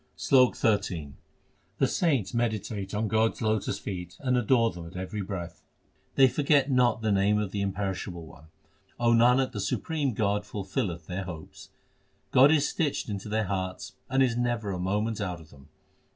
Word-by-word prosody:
SLOK 125 - +4
XIII 95 -9 0 0.6
The - - +3
saints 140 - 0
meditate 110 -4 -2
on 110 +1 0
God 110 +2 +2
s - - -13
lotus 110 -1 0
feet 90 -3 -6
and 125 -2 0
adore 120 -1 +3
them 85 -1 -9
at 85 - -13
every 95 +3 -4
breath. 95 -3 -6 0.5
They 135 - +7
forget 140 +1 +2
not 120 -3 +2
the 110 - +1
name 100 +1 +3
of 105 -3 -2
the 100 - -2
Imperishable 95 -3 -3
One; 80 -1 -15 0.5
O 120 -1 +3
Nanak, 125 +3 +4
the 110 - -5
supreme 140 - -1
God 105 -1 0
fulfilleth 100 - -4
their 95 +3 -4
hopes. 85 -3 -10 0.6
God 135 +3 +7
is 150 -2 +3
stitched 150 -8 -1
into 100 0 -5
their 110 0 0
hearts 95 0 -4 0.2
and 135 0 +3
is 125 -3 +1
never 120 -4 -1
a 90 - -4
moment 105 +4 -1
out 90 -4 -3
of 80 -2 -16
them. 70 +1 -17
105 Hz, 175 wpm, -28 LUFS, 95-120 Hz, 0.6 s, They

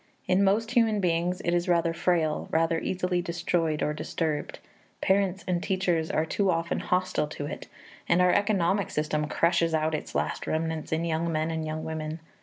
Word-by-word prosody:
In 185 +2 +3
most 215 +4 +2
human 225 -4 +3
beings 180 0 0
it 170 - +1
is 175 +1 0
rather 170 -1 +2
frail, 165 -2 0
rather 165 0 +2
easily 180 0 -1
destroyed 170 -2 -1
or 150 - 0
disturbed; 155 0 -3 0.4
parents 195 -1 +1
and 175 -1 0
teachers 180 -4 0
are 155 - +1
too 195 +4 0
often 165 -1 0
hostile 180 -4 0
to 145 -1 -6
it, 145 - -6 0.4
and 175 - +4
our 180 0 +5
economic 195 -2 +2
system 150 0 -1
crushes 165 0 +2
out 155 0 0
its 155 - -4
last - - -1
remnants 160 0 -2
in 160 +1 0
young 165 0 -1
men 155 +1 0
and 160 -1 -3
young 155 0 -4
women. 160 0 -4
170 Hz, 180 wpm, -27 LUFS, 160-180 Hz, 0.4 s, our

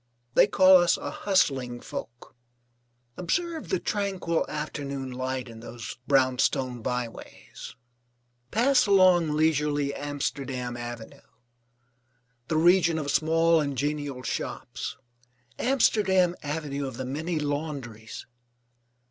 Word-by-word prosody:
They - - +6
call 190 -2 +7
us 175 -1 +3
a - - -5
hustling 135 -11 0
folk. 120 0 -8 0.8
Observe 330 - -2
the 380 - +2
tranquil 190 -5 -1
afternoon 140 -3 -4
light 130 0 -3
in 115 -1 -11
those 115 0 -8
brownstone 130 -2 +2
byways. 125 -1 -6 0.7
Pass 250 - +3
along 185 -4 +5
leisurely 150 -2 +1
Amsterdam 135 -4 -4
Avenue, 120 -1 -8 1.3
the 155 - 0
region 170 0 +4
of 145 -2 -2
small 165 +2 +3
and 140 -2 -3
genial 145 -1 -2
shops, - - -4 0.6
Amsterdam 195 -8 +3
Avenue 145 -2 -3
of 130 -3 -7
the 130 - -4
many 155 +6 -3
laundries. 145 -7 -4
145 Hz, 105 wpm, -27 LUFS, 130-175 Hz, 1.3 s, call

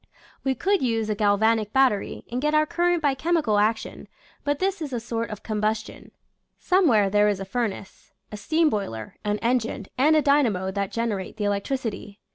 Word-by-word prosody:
We 265 -1 0
could 395 - +1
use 225 -4 0
a - - 0
galvanic 210 +1 +2
battery 260 -7 +1
and 245 +1 -2
get 300 +1 +1
our 305 0 +4
current 345 +1 0
by 285 -2 +3
chemical 280 -7 +1
action, 220 +2 -1 0.4
but 290 0 0
this 385 0 -1
is 295 -3 -4
a 240 - -1
sort 230 0 -3
of 210 - -8
combus 215 0 -1
tion. - - -13 0.5
Somewhere 295 - +3
there 205 +1 +3
is 200 -2 -1
a 195 - -5
furnace 205 -2 -4
— - - -46
a - - -6
steam 315 +10 +1
boiler, 115 - -4
an 210 0 0
engine, 230 -3 0
and 305 +4 +5
a 305 - +3
dynamo 235 -11 +2
that 200 0 -3
generate 215 -3 -3
the 210 - -3
electricity. 205 0 -3
225 Hz, 190 wpm, -24 LUFS, 205-285 Hz, 0.5 s, and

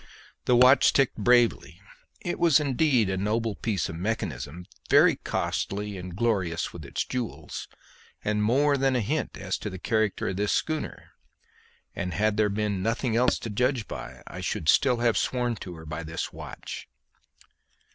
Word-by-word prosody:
The 125 - +4
watch 125 +3 +6
ticked 135 -2 +2
bravely. 115 - +3 0.4
It 175 - -3
was 165 -4 +5
indeed 135 -5 +2
a 95 0 -1
noble 110 +3 0
piece 100 -4 -1
of 80 - -6
mechanism, 85 - -3 0.2
very - - +6
costly 105 +1 -2
and 90 -1 -7
glorious 95 -7 0
with 80 -4 -9
its - - -2
jewels, 125 -3 -5 0.6
and 105 0 +1
more 140 +6 +3
than 135 -1 +2
a - - +2
hint 145 +9 -2
as 95 -1 -3
to 105 - -4
the 95 - -7
character 110 +1 0
of 95 - -4
this 105 0 +1
schooner; 155 -1 -3 0.8
and 90 -2 -3
had 110 0 +2
there 105 -1 +2
been 100 -1 -1
nothing 115 +3 0
else 125 +2 +3
to 115 - -6
judge 125 +1 0
by 65 0 -8
I - - -8
should 75 - -1
still 125 +4 +4
have 115 -1 +2
sworn 125 -2 0
to 90 -3 -8
her 80 0 -11
by 75 +1 -5
this 80 0 -5
watch. - - -8
110 Hz, 165 wpm, -27 LUFS, 95-125 Hz, 0.8 s, watch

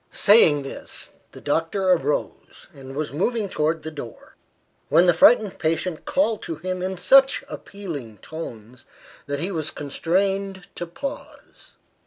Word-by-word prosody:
Saying 165 -9 +5
this, 135 - -9 0.2
the - - -12
doctor 165 +6 0
arose, 470 - -2
and 135 -2 -10
was 150 -1 -3
moving 210 +7 0
towards 160 -2 -1
the 160 - -5
door, 140 -7 -10 0.5
when 170 +4 +5
the 175 - +5
frightened 210 +4 +5
patient 165 +1 -2
called 230 -6 +1
to 165 - -5
him 185 +3 -4
in 185 0 -3
such 270 +10 +5
appealing 150 - -8
tones, 125 - -9 0.4
that 145 0 -2
he 180 +6 -2
was 155 -4 -2
constrained 190 +6 -1
to 175 - -6
pause. 275 +11 -9
170 Hz, 140 wpm, -23 LUFS, 150-195 Hz, 0.5 s, Saying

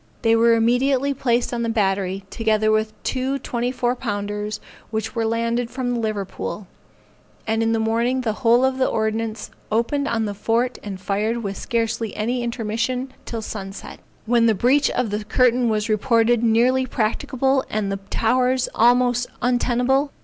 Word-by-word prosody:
They 225 0 +4
were 230 0 +5
immediately 255 +4 +2
placed 245 -2 0
in 235 - -2
the 230 - -1
battery, 195 -3 0
together 215 -1 +1
with 215 0 +1
two 265 +1 -1
twenty 245 -2 -2
four 245 -1 0
pounders 210 -2 -3 0.3
which 220 0 -3
were 230 -2 -1
landed 230 +1 -1
from 250 -1 -2
the 240 - -1
Liverpool, 210 -2 -4 0.8
and 220 0 0
in 225 0 +1
the 225 - +1
morning 235 +3 +1
the 225 -4 -1
whole 240 +1 +5
of 265 0 0
the 260 - +3
ordnance 220 0 -2 0.2
opened 255 +6 0
on 225 -3 0
the 205 - -3
fort 230 +5 0
and 195 -3 -6
fired 215 +5 -1
with 200 -1 -3
scarcely 225 0 -2
any 240 +4 -1
intermission 235 +2 -2
till 225 -2 -5
sunset, 195 -2 -7 0.3
when 230 0 +3
the 220 - +3
breach 260 +8 +3
on 250 -3 -1
the 210 +1 -3
curtain 245 +2 +2
was 215 -1 0
reported 230 +1 +2
nearly 245 +3 +3
practicable 260 +4 0
and 205 -2 -1
the 195 - -1
towers 255 +2 +1
almost 245 +1 +3
untenable. 250 +3 +1
230 Hz, 165 wpm, -22 LUFS, 215-250 Hz, 0.8 s, were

